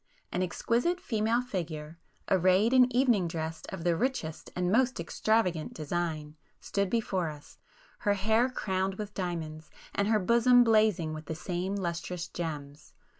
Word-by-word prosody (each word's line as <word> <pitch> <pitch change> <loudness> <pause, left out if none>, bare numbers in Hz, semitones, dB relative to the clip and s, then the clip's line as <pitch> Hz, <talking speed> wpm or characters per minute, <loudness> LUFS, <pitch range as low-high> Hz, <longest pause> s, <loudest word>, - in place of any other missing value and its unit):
An 180 - -1
exquisite 235 - 0
female 230 -5 0
figure, 165 -8 -5 0.3
arrayed 190 +5 +3
in 255 -1 +6
evening 240 -8 +3
dress 160 -1 -4
of 165 - -6
the 170 -1 +2
richest 200 -8 -2
and 180 0 0
most 255 +1 +2
extravagant 180 -1 0
design, 155 -1 -3 0.2
stood 200 -1 -1
before 190 -7 0
us, 150 -1 -12 0.4
her 205 0 +1
hair 220 +5 +2
crowned 190 -5 -1
with 210 0 -6
diamonds, 160 -4 -4 0.2
and 200 - +1
her 220 0 +4
bosom 235 +4 +5
blazing 215 -8 +3
with 155 -1 -8
the 160 - -3
same 180 +4 -3
lustrous 175 -1 -3
gems. 150 -4 -6
185 Hz, 145 wpm, -30 LUFS, 165-220 Hz, 0.4 s, in